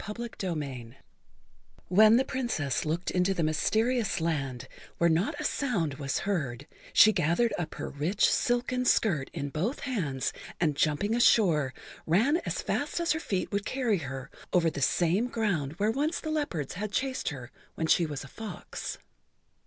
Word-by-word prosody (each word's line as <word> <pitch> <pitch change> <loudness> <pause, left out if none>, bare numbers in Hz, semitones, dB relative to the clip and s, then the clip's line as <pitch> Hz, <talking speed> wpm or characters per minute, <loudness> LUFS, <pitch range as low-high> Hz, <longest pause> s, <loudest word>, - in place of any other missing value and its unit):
[Pg 210 - -6
40] 235 - -5 0.2
CHAPTER 190 - -2 0.2
III 125 -3 -8 0.9
WHEN 215 +5 +7
the 265 - +2
Princess 235 - -1
looked 165 +4 -1
into 185 +1 +1
the 170 - 0
mysterious 220 +9 +1
land, 135 -6 -2 0.3
where 170 -1 +3
not 170 +7 0
a - - -3
sound 200 - 0
was 135 -2 -1
heard, 140 -10 -2 0.3
she 215 - +7
gathered 175 +7 +2
up 160 -2 -4
her - - -4
rich 160 +9 +1
silken 250 +1 +1
skirt 175 - +2
in 145 - -4
both 185 - -2
hands, 165 - -2 0.3
and 155 -4 +1
jumping 155 +9 +1
ashore, 175 - +4 0.4
ran 225 - +3
as - - -2
fast - - -1
as 340 0 +1
her 315 - +1
feet 190 - -2
would 200 0 -1
carry 240 -7 0
her 130 -3 -6 0.2
over 170 -2 +3
the 140 - -5
same 175 - +2
ground 190 - -1
where 205 +6 +1
once 295 +7 -1
the 315 - -4
leopards 240 - -2
had 205 +3 -4
chased 260 +4 -1
her 130 -5 -8 0.2
when 160 - -1
she 165 +1 +3
was 145 -3 -5
a - - -10
fox. 220 +8 -7
180 Hz, 170 wpm, -29 LUFS, 150-230 Hz, 0.9 s, WHEN